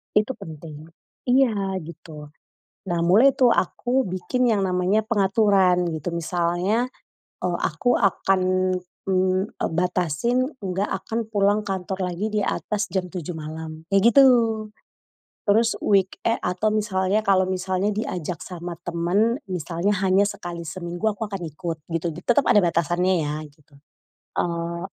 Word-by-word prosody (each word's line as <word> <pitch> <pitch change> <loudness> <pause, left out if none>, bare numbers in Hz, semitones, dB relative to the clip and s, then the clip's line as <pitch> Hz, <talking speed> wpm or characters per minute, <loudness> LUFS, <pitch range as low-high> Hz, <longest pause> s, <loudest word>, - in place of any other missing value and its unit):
Itu 215 +4 +3
penting, 155 -1 -10 0.4
iya 220 -7 +2
gitu. 155 -2 -11 0.6
Nah, 175 -2 0
mulai 220 +11 +5
tuh 250 -2 +4
aku 245 +6 +1
bikin 185 +8 -1
yang 205 -3 +2
namanya 185 +4 +1
pengaturan, 195 -4 +3
gitu. 160 +1 -4
Misalnya, 175 +7 0 0.6
eee, 175 -1 0
aku 205 +11 +1
akan, 195 -1 +2 0.7
mmm, 185 0 +2
eee, - - -2
batasin, 180 - 0
nggak 195 0 -2 0.2
akan 230 +1 -2
pulang 205 -1 +2
kantor 190 -1 -3
lagi 195 +5 -2
di 215 -1 -1
atas 210 +1 -2
jam 185 -1 -1
07:00 180 -2 -5
malam, 160 0 -7
kayak 200 +4 +4
gitu. 275 +2 +8 1.2
Terus 225 +3 +4
weeke 195 -2 +1 0.2
atau 180 +4 0
misalnya 210 -1 0
kalau 190 -2 +3
misalnya 185 +1 -1
diajak 185 -5 -3
sama 175 -1 -7
temen, 185 - +1
misalnya 180 +3 -1
hanya 195 +2 +4
sekali 175 -4 -6
seminggu 175 +5 -3
aku 215 +2 -4
akan 195 -3 -5
ikut, 165 +2 -5 0.2
gitu. 165 +1 -1
Tetep 240 - +1
ada - - +5
batasannya 175 +2 +1
ya, 145 0 -2
gitu. 145 0 -26 0.6
Eee, 170 0 -2
185 Hz, 130 wpm, -23 LUFS, 170-210 Hz, 1.2 s, gitu